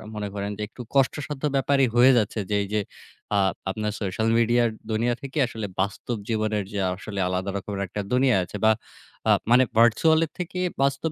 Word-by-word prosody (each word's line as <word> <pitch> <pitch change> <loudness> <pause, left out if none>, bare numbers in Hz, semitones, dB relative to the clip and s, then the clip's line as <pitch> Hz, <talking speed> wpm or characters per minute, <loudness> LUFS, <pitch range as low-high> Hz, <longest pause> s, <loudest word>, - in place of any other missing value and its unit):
মনে 105 -1 -3
করেন 100 +1 -3
যে - - -6
একটু 125 - -10
কষ্টসাধ্য 140 +1 0
ব্যাপারই 135 -1 +3
হয়ে 125 +2 +7
যাচ্ছে 110 0 0
যে, 105 - +1
এইযে 105 +1 -1 0.5
আ - - +3 0.3
আপনার 105 +2 -2
social 105 +3 -1
media 120 +1 +3
র - - -7 0.2
দুনিয়া 115 +3 +1
থেকে 140 +2 -7
আসলে 110 -3 -5 0.2
বাস্তব 105 +4 -3
জীবনের 110 -2 0
যে 100 - -2
আসলে 100 +2 -6
আলাদা 95 +2 -2
রকমের 100 0 -5
একটা 105 +3 -4
দুনিয়া 125 -2 +4
আছে 105 - -7
বা 110 - +7 0.6
আ - - +7 0.2
মানে 125 +1 +7 0.2
virtual 155 +8 +5
এর 155 - -14
থেকে 180 +1 -4 0.2
বাস্তব 140 +3 +1
110 Hz, 185 wpm, -25 LUFS, 105-135 Hz, 0.6 s, হয়ে